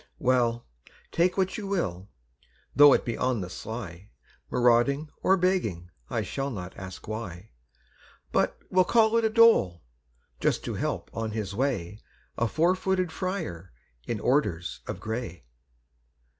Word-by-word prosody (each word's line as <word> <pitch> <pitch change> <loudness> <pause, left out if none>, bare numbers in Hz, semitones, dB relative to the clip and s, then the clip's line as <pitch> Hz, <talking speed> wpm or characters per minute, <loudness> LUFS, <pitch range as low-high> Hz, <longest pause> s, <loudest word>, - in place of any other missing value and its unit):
Well, 120 -2 +1 0.5
take 175 +3 +2
what 190 +3 0
you 205 - -5
will, 100 - -2 0.7
though 145 0 +9
it - - +1
be 120 - -2
on 125 -4 0
the 90 0 -6
sly, 100 -4 -7 0.4
Marauding 125 +5 +2
or 190 - +4
begging, 140 - 0 0.2
I 110 - -1
shall 135 +8 -3
not 95 -7 -7
ask 95 -1 -9
why, 105 -3 -6 0.8
But - - +1
will 185 0 +5
call 220 +3 +3
it 230 - +2
a - - +3
dole, 220 - +4 0.6
just - - 0
to - - -3
help - - -3
on 115 -1 -2
his 105 -3 -3
way 105 -5 -2 0.3
A 115 - +1
four 165 +9 +2
footed 185 -2 -1
friar 160 - -4 0.3
in 115 - -2
orders 105 - 0
of - - -5
gray! 110 - -5
120 Hz, 145 wpm, -27 LUFS, -, 0.8 s, though